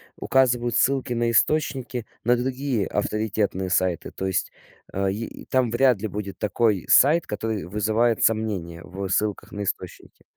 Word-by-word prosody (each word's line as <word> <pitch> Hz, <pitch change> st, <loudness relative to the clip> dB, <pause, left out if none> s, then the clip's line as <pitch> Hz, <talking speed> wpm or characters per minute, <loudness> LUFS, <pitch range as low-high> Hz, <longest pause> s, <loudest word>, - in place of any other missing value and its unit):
указывают 120 Hz, -3 st, +2 dB
ссылки 135 Hz, -2 st, +2 dB
на 120 Hz, 0 st, +1 dB
источники, 130 Hz, -2 st, 0 dB, 0.2 s
на 120 Hz, +2 st, +4 dB
другие 130 Hz, -3 st, -1 dB
авторитетные 105 Hz, -3 st, -1 dB
сайты, 90 Hz, -2 st, 0 dB
то 95 Hz, -, -5 dB
есть, 95 Hz, -1 st, -1 dB, 0.4 s
э, 95 Hz, 0 st, 0 dB
и 110 Hz, +3 st, -6 dB
там 130 Hz, -2 st, +1 dB
вряд 120 Hz, -2 st, +3 dB
ли 110 Hz, -, -1 dB
будет 100 Hz, -1 st, -6 dB
такой 105 Hz, -2 st, +1 dB
сайт, 155 Hz, +5 st, +5 dB
который 105 Hz, -3 st, -3 dB
вызывает 110 Hz, +4 st, +1 dB
сомнения 100 Hz, -7 st, 0 dB
в 95 Hz, +1 st, -6 dB
ссылках 105 Hz, +2 st, -1 dB
на 105 Hz, -, -4 dB
источники. 100 Hz, -, -6 dB
110 Hz, 145 wpm, -24 LUFS, 100-120 Hz, 0.4 s, сайт